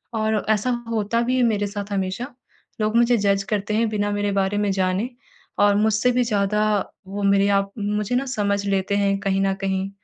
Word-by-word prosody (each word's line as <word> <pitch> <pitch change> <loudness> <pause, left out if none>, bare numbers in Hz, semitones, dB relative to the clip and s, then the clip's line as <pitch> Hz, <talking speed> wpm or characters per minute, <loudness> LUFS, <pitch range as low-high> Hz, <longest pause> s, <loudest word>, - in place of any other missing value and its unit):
और 220 -1 0
ऐसा 220 +3 +2 0.2
होता 225 +1 0
भी 250 +2 0
है 255 - +3
मेरे 210 -3 +1
साथ 200 0 -6
हमेशा 195 +5 -2 0.5
लोग 215 +1 0
मुझे 240 0 +4
जज़ 200 -1 +1
करते 210 0 -1
हैं 225 0 +1
बिना 205 -1 -1
मेरे 205 0 -1
बारे 195 +1 0
में 205 -1 +1
जाने 190 +4 0 0.5
और 205 0 +4
मुझसे 220 +3 +2
भी 250 0 +2
ज़्यादा 210 -2 +1 0.4
वो 200 +1 -5
मेरे 200 0 +3
आप 195 0 -4
मुझे 210 +2 -1
ना 265 +2 0
समझ 200 -1 0
लेते 195 0 0
हैं 200 -1 +1
कहीं 195 -1 0
न 195 0 +1
कहीं 190 0 -1
205 Hz, 195 wpm, -22 LUFS, 195-220 Hz, 0.5 s, मुझे